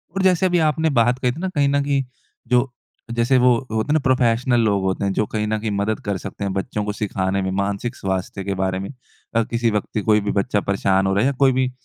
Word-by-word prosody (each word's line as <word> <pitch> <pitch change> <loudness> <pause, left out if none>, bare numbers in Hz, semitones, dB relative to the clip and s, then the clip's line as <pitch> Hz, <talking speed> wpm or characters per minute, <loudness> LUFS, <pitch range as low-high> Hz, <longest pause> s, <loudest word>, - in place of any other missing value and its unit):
और 195 - 0
जैसे 185 -1 +3
अभी 175 -1 +2
आपने 160 +1 +1
बात 120 +2 +3
कही 125 -1 +1
थी 130 - -8
ना 190 - -1
कहीं 145 -1 +3
न 140 0 +1
कहीं 140 -1 0 0.4
जो 125 +2 +2 0.5
जैसे 120 +3 +3
वो 125 0 +5 0.2
होते 110 +3 -1
है - - +4
ना 155 - +4
प्रोफेशनल 125 -1 +2
लोग 100 -3 +1
होते 95 +1 -1
हैं 100 - 0
जो 105 - +1
कहीं 105 -1 -1
न 110 0 0
कहीं 110 0 -3
मदद 100 +2 -1
कर 100 -2 -1
सकते - - -6
हैं 100 -1 -2
बच्चों 105 +2 -3
को 105 - -2
सिखाने 100 -2 -1
में 95 0 -2
मानसिक 100 +5 -2
स्वास्थ्य 95 0 -3
के 100 0 -2
बारे 95 0 0
में। 95 - -5 0.5
अ, 115 - +4
किसी 115 0 0
व्यक्ति 105 +1 -2
कोई 105 0 +5
भी 100 0 -2
बच्चा 100 +1 0
परेशान 95 0 +2
हो 95 - +1
रहा 100 - +2
है - - +2
या - - +2
कोई 135 - +6
भी, 130 -1 +1
110 Hz, 260 wpm, -21 LUFS, 100-130 Hz, 0.5 s, कोई